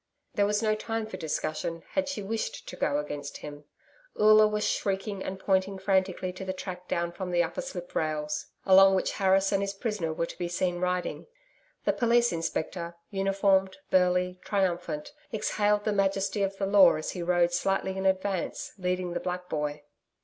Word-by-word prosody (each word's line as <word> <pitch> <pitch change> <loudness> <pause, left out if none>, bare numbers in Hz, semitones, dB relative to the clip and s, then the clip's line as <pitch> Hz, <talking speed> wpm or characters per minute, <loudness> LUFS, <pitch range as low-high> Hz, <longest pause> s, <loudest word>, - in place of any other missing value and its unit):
There 200 0 +2
was 210 +2 0
no 215 -1 +3
time 225 +1 -3
for 220 - -7
discussion, 160 +1 -3
had 285 -1 0
she 255 -8 -4
wished 220 +3 -4
to - - -7
go 145 - 0
against 145 -1 -5
him. 145 0 -9 0.5
Oola 215 0 +7
was 210 0 0
shrieking 195 0 -1
and 190 - -4
pointing 190 0 +1
frantically 190 -1 0
to 185 - -7
the 190 0 -3
track 180 -1 -7
down 170 0 -1
from 185 +1 -5
the 175 -1 +3
upper 175 +11 -3
slip 185 -10 -7
rails, 150 -1 -2 0.2
along 195 0 +7
which 190 - 0
Harris 195 0 +4
and 195 -1 +2
his 200 0 -2
prisoner 205 -7 -2
were 165 +1 -1
to - - -10
be 175 - -1
seen 175 0 -1
riding. 180 - -2 0.6
The - - +3
Police 240 0 +3
Inspector, 170 +1 -3 0.2
uniformed, 195 -1 +2
burly, 180 0 +2
triumphant, 175 - -1 0.2
exhaled 210 -1 +1
the 215 - 0
Majesty 195 +1 +1
of 195 0 -1
the 195 - -1
Law 195 -3 +7
as 155 - -3
he 180 - -5
rode 175 0 +2
slightly 190 +1 0
in 190 0 0
advance 190 -1 -1
leading 180 -1 -1
the - - -1
black 180 0 -4
boy. 150 -1 -2
190 Hz, 180 wpm, -28 LUFS, 175-200 Hz, 0.6 s, Oola